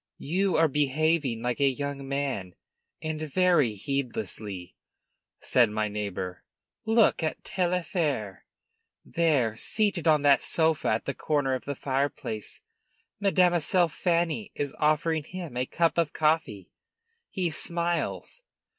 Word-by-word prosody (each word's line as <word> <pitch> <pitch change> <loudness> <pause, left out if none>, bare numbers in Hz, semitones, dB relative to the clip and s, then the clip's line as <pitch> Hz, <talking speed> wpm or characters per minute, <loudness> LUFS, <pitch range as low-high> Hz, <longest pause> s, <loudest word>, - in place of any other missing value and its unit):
"You 185 +5 0
are 165 0 +5
behaving 145 -3 +1
like 125 +2 -1
a 140 - +4
young 140 0 -4
man, 135 -10 -3 0.5
and 155 -1 -3
very 155 -6 +2
heedlessly," 105 -6 -4 0.7
said 120 -3 +3
my 105 0 -1
neighbor. 100 -3 -5 0.4
"Look 225 -3 +4
at 155 - -2
Taillefer! 170 - -1 0.7
there, 145 -10 +1
seated 195 - 0
on 150 -2 +4
that 140 -1 +5
sofa 160 -2 +1
at 110 +1 0
the 140 - -2
corner 145 -3 0
of 130 - -4
the 140 - -3
fireplace. 130 -6 -3 0.6
Mademoiselle 180 -3 +3
Fanny 170 +6 0
is 145 -1 -3
offering 155 +1 +1
him 170 -4 -8
a 125 +1 -1
cup 170 0 +1
of 160 -3 0
coffee. 155 - 0 0.6
He 180 -4 -1
smiles. 170 - -2
150 Hz, 120 wpm, -27 LUFS, 125-170 Hz, 0.7 s, are